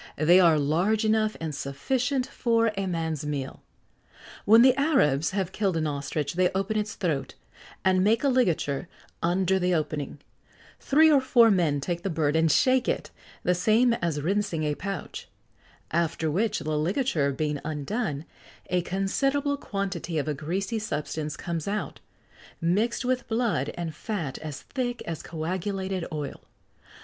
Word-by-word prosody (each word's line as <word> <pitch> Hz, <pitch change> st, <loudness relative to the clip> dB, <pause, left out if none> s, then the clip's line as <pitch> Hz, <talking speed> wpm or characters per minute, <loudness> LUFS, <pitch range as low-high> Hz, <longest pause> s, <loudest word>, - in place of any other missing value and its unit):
They 170 Hz, +5 st, +6 dB
are 170 Hz, -4 st, +5 dB
large 175 Hz, +10 st, +1 dB
enough 215 Hz, 0 st, +2 dB
and 160 Hz, -2 st, -4 dB
sufficient 250 Hz, -, -1 dB
for 230 Hz, -3 st, +1 dB
a 195 Hz, -1 st, -2 dB
man's 160 Hz, -4 st, -2 dB
meal. 140 Hz, -3 st, -4 dB, 0.8 s
When 225 Hz, +3 st, +7 dB
the 260 Hz, 0 st, +7 dB
Arabs 215 Hz, -, +2 dB
have 190 Hz, -2 st, -2 dB
killed 195 Hz, -4 st, 0 dB
an 160 Hz, -, 0 dB
ostrich 145 Hz, 0 st, -2 dB
they 180 Hz, +1 st, +3 dB
open 195 Hz, +3 st, -1 dB
its 210 Hz, -1 st, -2 dB
throat, 155 Hz, -7 st, -2 dB, 0.5 s
and 185 Hz, -1 st, +4 dB
make 220 Hz, +5 st, +3 dB
a -, -, +3 dB
ligature 180 Hz, -, +1 dB, 0.3 s
under 185 Hz, +2 st, +2 dB
the 180 Hz, 0 st, +1 dB
opening; 150 Hz, -3 st, -3 dB, 0.6 s
three 315 Hz, +3 st, +5 dB
or 280 Hz, -3 st, +5 dB
four 235 Hz, -3 st, +5 dB
men 165 Hz, -7 st, +2 dB
take 170 Hz, +4 st, -3 dB
the 195 Hz, -, -2 dB
bird, 155 Hz, -3 st, 0 dB
and 160 Hz, -1 st, +3 dB
shake 255 Hz, -, +3 dB
it, -, -, -2 dB, 0.3 s
the 180 Hz, -, +3 dB
same 220 Hz, +7 st, +3 dB
as 170 Hz, -9 st, -1 dB
rincing 180 Hz, -1 st, 0 dB
a 150 Hz, -1 st, 0 dB
pouch; 195 Hz, +2 st, -6 dB, 0.6 s
after 165 Hz, -1 st, 0 dB
which, 205 Hz, +7 st, +1 dB
the 155 Hz, -1 st, -2 dB
ligature 165 Hz, -, +1 dB
being 150 Hz, +1 st, -2 dB
undone, 155 Hz, -, -3 dB, 0.5 s
a 180 Hz, -1 st, +2 dB
considerable 275 Hz, +11 st, 0 dB
quantity 195 Hz, -, -4 dB
of 150 Hz, -, -1 dB
a 150 Hz, -, 0 dB
greasy 190 Hz, -, -2 dB
substance 150 Hz, -6 st, -4 dB
comes 170 Hz, -1 st, -4 dB
out, 210 Hz, +1 st, -3 dB, 0.6 s
mixed 210 Hz, +9 st, 0 dB
with 255 Hz, 0 st, 0 dB
blood 225 Hz, -, 0 dB
and 170 Hz, -2 st, -4 dB
fat 165 Hz, -, -4 dB
as 150 Hz, -3 st, -7 dB
thick 245 Hz, -3 st, -3 dB
as 165 Hz, -2 st, -4 dB
coagulated 185 Hz, +3 st, -3 dB
oil. 150 Hz, -2 st, -5 dB
180 Hz, 155 wpm, -26 LUFS, 155-220 Hz, 0.8 s, When